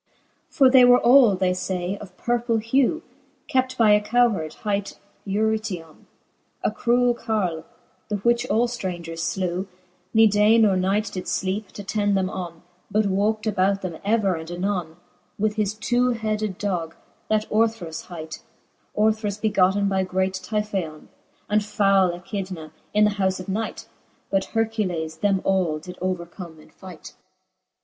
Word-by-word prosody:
X. - - -23
For 270 -4 +7
they 255 -1 +7
were 245 0 +7
all, 240 -4 +6
they 185 0 +1
iay, 180 0 -2
of 185 -3 -12
purple 240 -1 0
hew, 260 +8 +1 0.4
Kept 255 0 0
by 220 -3 +5
a 210 0 +5
cowheard, 210 -8 +1
hight 200 -1 -2 0.3
Eurytion^ 205 -5 -2 0.6
A - - +1
cruell 245 0 +2
carle, 205 -9 -2 0.4
the 210 - 0
which 235 +4 +1
all 235 +1 +2
ftrangers 175 -8 -4
flew, 185 0 -2 0.4
Ne 225 0 +6
day 210 +1 +4
or 195 -2 +3
night 200 +3 0
did 185 - -5
fleepe, 195 +3 -2
t'attend 205 0 -1
them, 185 -1 -1
on, 170 -3 -7 0.3
But 215 +1 +2
walkt 210 +3 0
about 195 -2 +1
them 170 -4 -5
ever 205 -2 +2
and 160 -1 -6
anone, 175 -2 -2 0.4
With 210 +1 0
his 210 -1 -1
two 240 +3 +1
headed 215 -3 -2
dogge, 175 -5 -2 0.4
that 215 0 +1
Orthrus 215 -7 0
hight 160 -3 -8 0.5
5 210 - +2
Orthrus 210 -2 -4
begotten 200 -2 +2
by 190 -1 +1
great 190 0 -1
T^yphaon^ 190 -5 -4 0.4
And 210 +1 +2
foule 195 -4 +2
Echidna^ 185 -5 -6 0.2
in 210 0 +3
the 210 - +4
houfe 190 0 +1
of 185 - -8
night 215 +3 -4 0.2
", - - -39
But 195 -1 +1
Hercules 195 -8 -2
them 195 +1 +1
all 185 -5 +1
did 180 +4 -10
overcome 175 -2 -5
in - - -18
fight. 185 -4 -12
200 Hz, 155 wpm, -23 LUFS, 185-220 Hz, 0.6 s, For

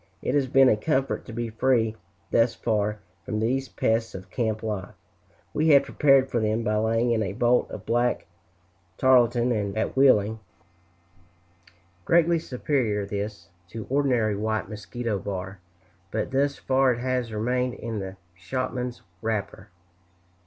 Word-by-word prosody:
It 125 - -1
has 140 -2 +2
been 135 +1 +5
a 120 - +5
comfort 135 +4 -1
to - - -9
be 115 0 -4
free, 115 -1 +1 0.4
thus 115 0 +3
far, 105 -2 -1 0.2
from 110 - -3
these 130 +4 0
pests 115 -1 0
of 95 0 -9
camp 110 -3 -1
life. 105 -4 -4 0.6
We 155 - +1
had 140 -3 +7
prepared 135 -2 +4
for 120 - +1
them 110 +1 0
by 105 -1 0
laying 115 +2 +1
in 115 -2 +1
a 100 -2 -2
bolt 120 +3 +2
of - - -8
black 120 +1 +1 0.7
tarlatan 120 -5 +3
at 110 - -1
Wheeling, 110 -5 +4 1.6
greatly 170 - +3
superior 125 -8 -1
this, 100 -3 -5 0.2
to 110 +4 -7
ordinary 125 -7 +2
white 110 0 -2
mosquito 105 +1 -4
bar, 95 0 -5 0.5
but 110 +6 -3
thus 140 +1 +1
far 130 -1 +2
it 120 - -6
has 125 -2 -1
remained 125 +3 -1
in 115 -2 -5
the 95 -1 -6 0.2
shopman's 125 +6 -4 0.2
wrapper. 110 -2 -3
115 Hz, 145 wpm, -25 LUFS, 105-130 Hz, 1.6 s, had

